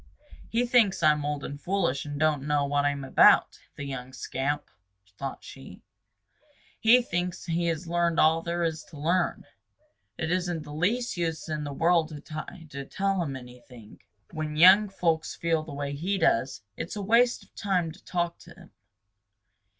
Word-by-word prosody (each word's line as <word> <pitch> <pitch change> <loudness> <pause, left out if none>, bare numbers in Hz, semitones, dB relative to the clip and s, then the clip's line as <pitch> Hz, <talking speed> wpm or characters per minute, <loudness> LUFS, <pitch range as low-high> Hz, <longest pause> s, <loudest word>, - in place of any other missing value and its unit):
"He 235 +2 +1
thinks 235 -6 +3
I'm 150 -1 +4
old 145 -1 -3
and 145 +1 -7
foolish 175 -8 -1
and 145 0 -5
don't 155 -2 +2
know 145 -1 +2
what 145 0 +1
I'm 140 -1 -1
about, 135 - +5 0.2
the - - -6
young 130 -2 -6
scamp!" 140 +3 -3 0.4
thought 135 +3 -6
she. - - -12 1.0
"He 240 +3 +6
thinks 175 -4 -3
he 170 0 -1
has 165 +1 -2
learned 170 0 +1
all 160 +1 +4
there 170 +1 -2
is 160 -1 -2
to 155 - -13
learn. 170 +4 0 0.7
It 160 0 -2
isn't 175 -3 -1
the 150 -1 -10
least 210 +9 0
use 165 -2 -2
in 155 -1 -3
the 145 - -5
world 165 +2 +2
to 150 -2 -8
try 155 +2 -8
to 140 0 -5
tell 195 +6 -1
him 140 -5 -3
anything. 125 -3 -13 0.3
When 155 -2 -4
young 190 +6 +7
folks 165 -4 -1
feel 165 -1 0
the 155 0 -10
way 140 0 -3
he 180 +8 -1
does, 130 - +1
it - - -5
is - - -7
a 205 - -4
waste 235 +4 +3
of - - -25
time 180 -5 -1
to 155 - -16
talk 175 -1 -2
to 170 0 -15
them. 180 -2 -16
165 Hz, 180 wpm, -27 LUFS, 145-180 Hz, 1.0 s, young